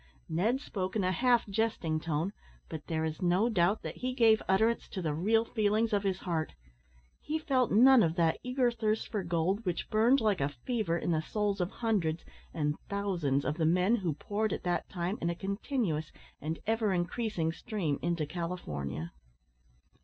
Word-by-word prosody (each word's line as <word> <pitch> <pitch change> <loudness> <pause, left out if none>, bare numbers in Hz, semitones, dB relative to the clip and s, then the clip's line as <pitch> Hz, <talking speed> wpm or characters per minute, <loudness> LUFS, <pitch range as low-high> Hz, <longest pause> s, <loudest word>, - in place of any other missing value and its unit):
Ned 205 +11 +1
spoke 190 -9 -4
in 210 - +1
a 185 - +2
half 240 +5 +3
jesting 200 -7 0
tone, 165 +4 -2 0.4
but 155 -2 -7
there 160 -1 -1
is 155 -1 -4
no 180 +6 +3
doubt 195 -1 +2
that - - -6
he 255 0 -3
gave 225 -3 +5
utterance 220 +5 +2
to 195 - -6
the 160 -4 -1
real 220 +8 +2
feelings 215 0 +1
of 205 - +3
his 195 -2 0
heart. 165 -4 -2 0.7
He 310 +1 -2
felt 260 -6 +1
none 255 +4 +7
of 165 -4 +2
that 165 -2 +2
eager 250 -1 +1
thirst 220 -2 -1
for 210 -3 -1
gold 175 +4 0
which 180 +2 -3
burned, 235 +5 +4
like 210 - +1
a 140 - +1
fever, 170 - -2
in 170 - -1
the 155 -1 +1
souls 205 +3 -1
of 175 - 0
hundreds 190 -10 -1 0.3
and 150 -2 -1
thousands 175 -9 0
of 150 - -1
the 160 - +1
men 180 +7 +3
who 180 -7 -1
poured 210 +6 -1
at - - -4
that 175 -1 -1
time 180 +2 -3
in 170 - 0
a 170 - -1
continuous 195 - -2 0.3
and 160 +2 -3
ever 220 -2 +1
increasing 180 -1 -1
stream 170 - -3
into 170 -2 0
California. 85 - -4
190 Hz, 185 wpm, -31 LUFS, 165-220 Hz, 0.7 s, none